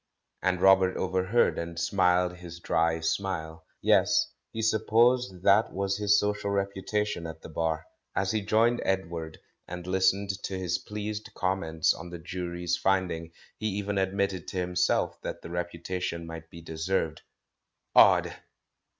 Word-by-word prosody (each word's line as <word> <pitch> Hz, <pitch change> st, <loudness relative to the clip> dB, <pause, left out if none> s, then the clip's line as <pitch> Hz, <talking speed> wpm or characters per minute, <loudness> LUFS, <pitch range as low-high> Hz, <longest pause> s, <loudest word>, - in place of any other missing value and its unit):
and 90 Hz, -1 st, +1 dB
Robert 95 Hz, -1 st, +5 dB
overheard, 95 Hz, +5 st, +1 dB
and 85 Hz, 0 st, -5 dB
smiled 90 Hz, 0 st, +2 dB
his 85 Hz, -1 st, -10 dB
dry 80 Hz, -1 st, +1 dB
smile. 80 Hz, -1 st, -3 dB, 0.2 s
Yes, -, -, +3 dB, 0.2 s
he 110 Hz, -, -6 dB
supposed 110 Hz, -2 st, +2 dB
that 100 Hz, +3 st, +4 dB
was 100 Hz, +1 st, -1 dB
his 105 Hz, 0 st, +4 dB
social 105 Hz, 0 st, -1 dB
reputation 100 Hz, -2 st, -1 dB
at 80 Hz, 0 st, -9 dB
the -, -, -9 dB
Bar. 80 Hz, -1 st, -1 dB, 0.3 s
As 95 Hz, 0 st, +1 dB
he 110 Hz, -, 0 dB
joined 115 Hz, +4 st, +2 dB
Edward, 85 Hz, -4 st, -2 dB, 0.3 s
and 90 Hz, 0 st, -7 dB
listened 95 Hz, +2 st, +2 dB
to 95 Hz, -, -4 dB
his 90 Hz, 0 st, -1 dB
pleased 105 Hz, +1 st, -5 dB
comments 90 Hz, -4 st, +1 dB
on 85 Hz, +1 st, -9 dB
the 85 Hz, -, -7 dB
Jury's 85 Hz, 0 st, -3 dB
finding, 90 Hz, -4 st, 0 dB, 0.3 s
he 110 Hz, -, -1 dB
even 100 Hz, 0 st, -1 dB
admitted 95 Hz, -1 st, -1 dB
to -, -, -5 dB
him 90 Hz, 0 st, -2 dB
self 90 Hz, -, +1 dB
that -, -, -6 dB
the 85 Hz, -, -8 dB
reputation 85 Hz, 0 st, -3 dB
might 80 Hz, -1 st, -9 dB
be 85 Hz, -, -11 dB
deserved. 80 Hz, 0 st, -2 dB, 0.7 s
Odd -, -, +6 dB
95 Hz, 145 wpm, -28 LUFS, 85-100 Hz, 0.7 s, Odd